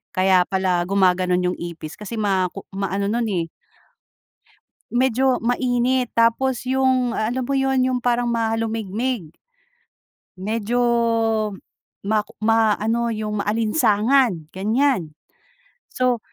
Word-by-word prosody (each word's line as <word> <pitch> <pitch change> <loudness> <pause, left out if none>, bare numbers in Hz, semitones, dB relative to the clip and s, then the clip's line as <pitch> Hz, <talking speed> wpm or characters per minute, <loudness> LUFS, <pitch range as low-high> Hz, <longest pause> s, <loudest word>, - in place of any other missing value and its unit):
kaya 185 -1 +4
pala 185 -2 0
gumaganon 180 -1 +2
yung 180 0 -1
ipis 170 -2 -7
kasi 210 +2 -6
ma 190 -3 +1
ku 195 - -9
maano 195 0 -1
nun, 235 +2 0
eh 170 -3 -1 1.4
medyo 255 +1 +2
mainit 245 +1 0
tapos 245 +3 +2
yung 260 -2 +1
alam 240 +4 -1
mo 275 - -1
yun 270 -1 +1
yung 255 0 +1
parang 245 0 +1
mahalumigmig. 225 -3 -2 1.1
Medyo 220 +4 -2 1.3
mak 215 0 +1
ma 225 -1 +3
ano 230 +2 0
yung 215 -2 -3
maalinsangan 215 - +2
ganyan. 215 - 0 0.8
So 250 -2 +1
225 Hz, 105 wpm, -21 LUFS, 195-245 Hz, 1.4 s, kaya